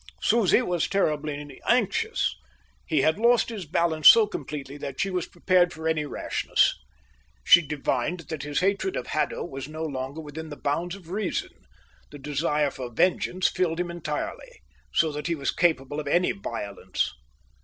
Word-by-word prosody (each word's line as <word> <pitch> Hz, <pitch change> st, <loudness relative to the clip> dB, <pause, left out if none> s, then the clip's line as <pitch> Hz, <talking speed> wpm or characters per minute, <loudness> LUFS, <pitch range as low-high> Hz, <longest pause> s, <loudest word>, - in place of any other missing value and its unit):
Susie 230 Hz, +1 st, +3 dB
was 175 Hz, -6 st, 0 dB
terribly 150 Hz, -6 st, -2 dB
anxious. 245 Hz, -, +1 dB, 0.5 s
He 155 Hz, -4 st, +2 dB
had 155 Hz, +7 st, +2 dB
lost 235 Hz, +1 st, +4 dB
his 205 Hz, -8 st, -6 dB
balance 160 Hz, 0 st, +2 dB
so 225 Hz, -2 st, +8 dB
completely 145 Hz, -8 st, -6 dB
that 140 Hz, -2 st, -7 dB
she 195 Hz, 0 st, 0 dB
was 180 Hz, -2 st, -2 dB
prepared 180 Hz, 0 st, +2 dB
for 160 Hz, 0 st, -5 dB
any 155 Hz, -2 st, 0 dB
rashness. -, -, +1 dB, 0.7 s
She 175 Hz, -, +8 dB
divined 150 Hz, +2 st, -2 dB
that 155 Hz, -1 st, -6 dB
his 145 Hz, +3 st, -2 dB
hatred 200 Hz, -, 0 dB
of -, -, -3 dB
Haddo -, -, -1 dB
was 135 Hz, -5 st, -7 dB
no 155 Hz, +1 st, -6 dB
longer 135 Hz, 0 st, -4 dB
within 160 Hz, +1 st, -7 dB
the 145 Hz, -, -7 dB
bounds 170 Hz, +5 st, -2 dB
of 180 Hz, -4 st, -13 dB
reason. 200 Hz, -1 st, -2 dB, 0.6 s
The 145 Hz, -, -10 dB
desire 150 Hz, +1 st, 0 dB
for 125 Hz, -2 st, -7 dB
vengeance 185 Hz, +6 st, +2 dB
filled 170 Hz, -2 st, -1 dB
him 175 Hz, -1 st, -2 dB
entirely, 170 Hz, -, -5 dB, 0.3 s
so 160 Hz, -2 st, +2 dB
that 150 Hz, +2 st, -4 dB
he 170 Hz, -, 0 dB
was 140 Hz, -3 st, -1 dB
capable 150 Hz, -4 st, +1 dB
of 150 Hz, -, -5 dB
any 175 Hz, +5 st, +3 dB
violence. 100 Hz, -, -3 dB
160 Hz, 165 wpm, -26 LUFS, 145-180 Hz, 0.7 s, so